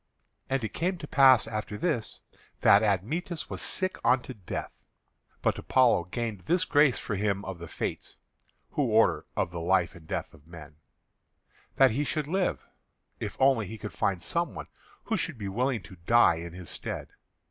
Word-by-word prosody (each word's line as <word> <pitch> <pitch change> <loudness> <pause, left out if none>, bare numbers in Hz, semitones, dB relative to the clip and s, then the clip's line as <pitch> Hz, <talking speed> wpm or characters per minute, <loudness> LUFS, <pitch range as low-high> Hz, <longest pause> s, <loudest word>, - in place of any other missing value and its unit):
And 135 -2 0
it 110 - -4
came 180 +3 -1
to 160 -3 -8
pass 135 -2 +6
after 105 -2 -4
this 150 -9 -2 0.4
that 100 - +7
Admetus 145 - -1
was - - -5
sick 185 0 -1
unto 130 0 +2
death. 100 -7 -6 0.7
But - - +1
Apollo 125 -9 +3
gained 110 +2 -4
this 175 0 +2
grace 145 -3 +4
for 105 - -3
him 100 0 -1
of 95 -2 -6
the 85 - -7
Fates - - -5 0.5
(who - - -1
order - - +3
of 85 - -1
life 85 +1 +1
and 80 -2 -15
death - - -3
for - - -18
men), 75 -2 -12 1.0
that 135 -2 +6
he 140 +7 0
should 150 0 -2
live, 185 +5 -1 0.5
if - - -5
only 130 -6 +3
he 110 - -7
could 105 0 -7
find 95 -4 -1
some 170 - -1
one - - -6 0.4
who 225 - -1
should 170 -10 -2
be 105 -3 -5
willing 120 +2 -1
to 90 +2 -12
die 120 -8 +5
in 85 0 -7
his 90 -2 -6
stead. - - -5
110 Hz, 175 wpm, -28 LUFS, 95-140 Hz, 1.0 s, that